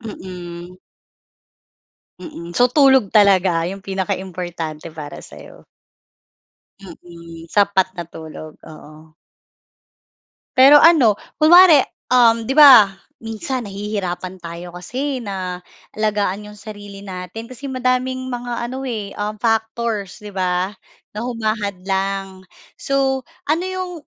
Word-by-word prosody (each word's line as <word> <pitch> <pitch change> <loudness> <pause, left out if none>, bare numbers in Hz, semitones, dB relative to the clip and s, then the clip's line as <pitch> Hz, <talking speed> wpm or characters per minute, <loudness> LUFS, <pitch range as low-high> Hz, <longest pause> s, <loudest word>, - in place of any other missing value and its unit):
Mm. 180 -5 -9 1.4
Mm. 170 - -9
So, 245 +6 +3
tulog 265 -5 +4
talaga 190 -5 +3
yung 195 +1 -7
pinaka 195 0 -3
importante 170 -4 -6
para 150 -2 -9
sa - - -13
iyo. - - -15 1.2
Mm, 170 -2 -12
sapat 200 -2 +3
na 175 - -4
tulog, 155 -1 -10
oo. 155 0 -14 1.4
Pero 270 +3 +8
ano, 275 -11 +6 0.2
kunwari, 330 -1 +8 0.3
um, 230 -2 +4
'di 260 - -2
ba, 265 -9 +8 0.3
minsan 230 +3 -4
nahihirapan 195 -3 -5
tayo 170 +1 -8
kasi 260 +10 -4
na 185 -2 -5 0.3
alagaan 210 -2 -1
iyong 210 0 -12
sarili 205 -1 -10
natin 185 +4 -7
kasi 260 +2 -8
madaming 255 0 -1
mga 240 -1 -4
ano 260 +1 -6
eh, 215 -6 -5
um, 210 +1 -4
factors 225 -2 -1
'di 210 - -9
ba? 185 +2 -1 0.4
Na 220 - -3
humahadlang. 195 -4 -3 0.3
So, 270 -1 -1 0.2
ano 320 +4 +1
iyong 370 -1 -4
205 Hz, 110 wpm, -19 LUFS, 180-245 Hz, 1.4 s, Pero